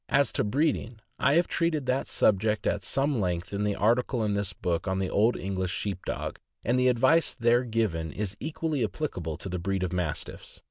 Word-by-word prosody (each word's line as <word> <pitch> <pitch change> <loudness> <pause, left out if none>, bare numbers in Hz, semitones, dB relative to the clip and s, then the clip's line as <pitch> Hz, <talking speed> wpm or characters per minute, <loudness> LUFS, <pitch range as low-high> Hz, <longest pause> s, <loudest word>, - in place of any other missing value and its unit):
As 140 +1 +3
to - - 0
breeding, 125 0 0 0.2
I 140 - +3
have 170 +1 +4
treated 165 -4 0
that 130 +1 0
subject 105 +1 +2
at - - +1
some 135 -3 +1
length 90 0 -2
in 100 - -1
the 105 -1 0
article 120 +2 +2
in 105 -1 0
this 100 -1 -1
book 90 +2 -2
on 95 0 0
the 95 -1 -1
Old 110 +4 +3
English 95 -1 -2
Sheep 95 0 -3
Dog, - - -3 0.3
and 120 +3 +2
the 125 - +4
advice 130 +7 +3
there 120 0 +3
given 110 - -1
is 100 +2 -3
equally 155 -2 -2
applicable 90 - -3
to - - -6
the 90 -1 -3
breeding 95 +1 -1
of 90 - -4
Mastiffs. 90 -5 -4
105 Hz, 200 wpm, -28 LUFS, 95-130 Hz, 0.3 s, have